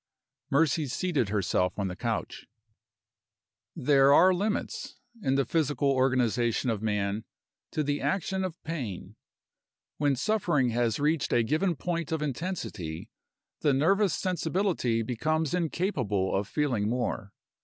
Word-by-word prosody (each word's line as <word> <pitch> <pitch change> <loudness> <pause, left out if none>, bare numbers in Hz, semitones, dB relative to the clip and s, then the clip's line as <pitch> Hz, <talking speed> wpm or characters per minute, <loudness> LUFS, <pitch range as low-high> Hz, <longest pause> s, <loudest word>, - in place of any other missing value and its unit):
Mercy 150 +1 +2
seated 140 - 0
herself 95 -3 0
on 100 -2 -1
the 90 - -5
couch. - - -3 1.3
There 135 0 +4
are 185 +6 +7
limits, 205 +4 -2 0.2
in 135 -7 +1
the 140 -1 +2
physical 145 -3 +1
organization 125 -2 +1
of 105 -2 -3
man, 105 -1 -1 0.5
to 155 - -1
the 145 0 -1
action 190 0 -1
of 180 -3 -4
pain. 110 - -5 0.8
When 145 -2 +2
suffering 150 - +1
has 115 -2 0
reached 150 +1 +1
a 120 - +3
given 165 +9 +1
point 170 0 -3
of 160 -2 -1
intensity 135 - -4 0.5
the 145 - +2
nervous 190 +7 +3
sensibility 175 - 0
becomes 155 +7 -1
incapable 150 - 0
of 100 +1 -1
feeling 120 -9 0
more. 120 -4 -2
140 Hz, 125 wpm, -28 LUFS, 115-165 Hz, 1.3 s, are